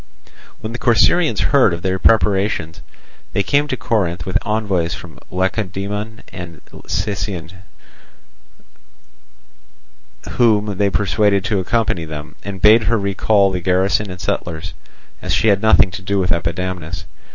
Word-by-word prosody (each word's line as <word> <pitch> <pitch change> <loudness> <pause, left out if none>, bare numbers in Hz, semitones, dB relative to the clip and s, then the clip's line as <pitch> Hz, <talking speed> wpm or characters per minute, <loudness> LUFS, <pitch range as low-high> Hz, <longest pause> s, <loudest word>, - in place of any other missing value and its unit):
When 110 - -5
the 120 - -5
Corcyraeans 150 +8 +3
heard 130 -11 +4
of 85 - -10
their 95 0 0
preparations 100 -6 +1 0.5
they 100 - +1
came 145 +8 +2
to 130 - -2
Corinth 95 -9 -1
with 95 - -5
envoys 100 -5 -1
from 80 -4 -12
Lacedaemon 100 +3 -3
and 85 -5 -8 0.3
Sicyon, 100 -5 -3 2.8
whom 105 -4 +1
they 100 -1 +3
persuaded 100 0 +1
to 105 -3 0
accompany 95 -3 0
them, 75 0 -8
and 100 -2 -6
bade 110 +1 +6
her 115 +2 +2
recall 100 0 +2
the 90 - -2
garrison 95 +3 +1
and 90 0 -8
settlers, 80 -3 -3 0.5
as - - 0
she 110 - +3
had 100 -1 +3
nothing 110 -4 +5
to 85 - -7
do 100 +2 -1
with 90 -3 +1
Epidamnus. 85 0 -3
100 Hz, 135 wpm, -18 LUFS, 90-105 Hz, 2.8 s, bade